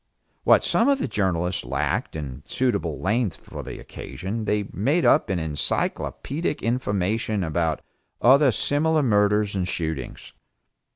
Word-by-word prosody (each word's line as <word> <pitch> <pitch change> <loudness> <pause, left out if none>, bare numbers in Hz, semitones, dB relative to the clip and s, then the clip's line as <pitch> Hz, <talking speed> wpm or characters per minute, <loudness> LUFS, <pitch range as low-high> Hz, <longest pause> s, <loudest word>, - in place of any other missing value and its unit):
What - - +6
some - - +3
of 280 - +4
the 265 - -2
journals 90 -5 -1
lacked 70 +5 -2
in 70 -3 -6
suitable 115 - -1
length 105 0 0
for - - -9
the - - -7
occasion, 110 +4 -6
they 105 0 +1
made 140 - +1
up - - +4
in 95 - 0
encyclopaedic 85 - -2
information 110 -3 0
about 80 -1 -1 0.4
other 135 +2 +6
similar 155 +5 +1
murders 105 -3 +2
and 90 -2 -1
shootings. 80 -7 -4
105 Hz, 130 wpm, -24 LUFS, 85-125 Hz, 0.4 s, What